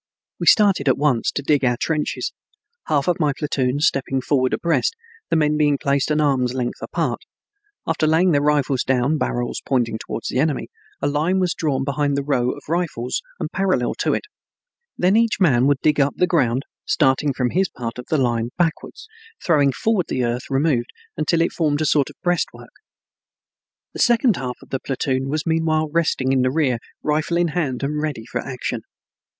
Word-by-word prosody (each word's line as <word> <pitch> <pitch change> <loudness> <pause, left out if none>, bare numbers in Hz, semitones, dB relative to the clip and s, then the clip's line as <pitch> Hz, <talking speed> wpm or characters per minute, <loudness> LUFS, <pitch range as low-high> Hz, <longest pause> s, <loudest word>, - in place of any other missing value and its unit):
We - - -3
started 195 -9 +5
at - - +3
once 140 -5 +1
to 140 - -3
dig 145 0 +2
our 120 -1 +2
trenches, 155 -2 -2 0.5
half 145 -2 +1
of 180 - +1
my 150 -3 +2
platoon 140 -2 -1
stepping 135 -3 +1
forward 130 -1 +1
abreast, 315 - 0 0.3
the 165 - +1
men 150 -1 +2
being 145 -2 +3
placed 140 +1 0
an 150 0 +1
arm's 130 -4 +1
length 125 -2 -3
apart. - - -2 0.7
After 165 -1 0
laying 165 +4 +3
their 145 -2 +3
rifles 145 -3 +1
down, 130 +4 +1
barrels 120 0 -2
pointing 120 -4 0
to - - -5
the 130 - -1
enemy, 150 0 0 0.3
a - - +3
line 155 +6 +1
was 180 -2 +1
drawn 140 -4 -1
behind 140 +1 0
the 140 - -1
row 130 -4 +1
of - - -5
rifles 160 -7 -2 0.2
and - - -4
parallel 185 -11 0
to - - +1
it. - - -3 0.7
Then 185 +3 +3
each 230 -1 +2
man 135 -9 +4
would 145 -1 +3
dig 150 -1 +3
up 140 0 +2
the 180 - +4
ground, 135 -8 +1 0.2
starting 140 +1 +2
from 125 -2 -1
his 190 +2 +1
part 120 0 -6
of 125 - -8
the 155 - +2
line 120 -3 0
backwards, 175 - -2 0.4
throwing 145 -5 +4
forward 200 - 0
the 130 - -1
earth 120 +1 -2
removed, 135 -3 +1 0.3
until 160 +2 +1
it 165 - +1
formed 150 -3 0
a 155 - 0
sort 145 -2 +2
of - - -14
breastwork. 175 -1 -2 1.2
The - - -8
second 235 -3 +3
half 125 -1 -4
of - - -18
the 135 - -2
platoon 135 0 -2
was 155 +2 -2
meanwhile 160 -1 +1
resting 150 -5 +1
in 135 -1 +3
the 130 - +2
rear, 135 -5 +1 0.2
rifle 155 +3 0
in 175 -1 +2
hand 145 -6 -2
and 150 +2 -1
ready 145 -8 -3
for 125 +1 -3
action. 130 -2 -4
145 Hz, 190 wpm, -21 LUFS, 130-160 Hz, 1.2 s, started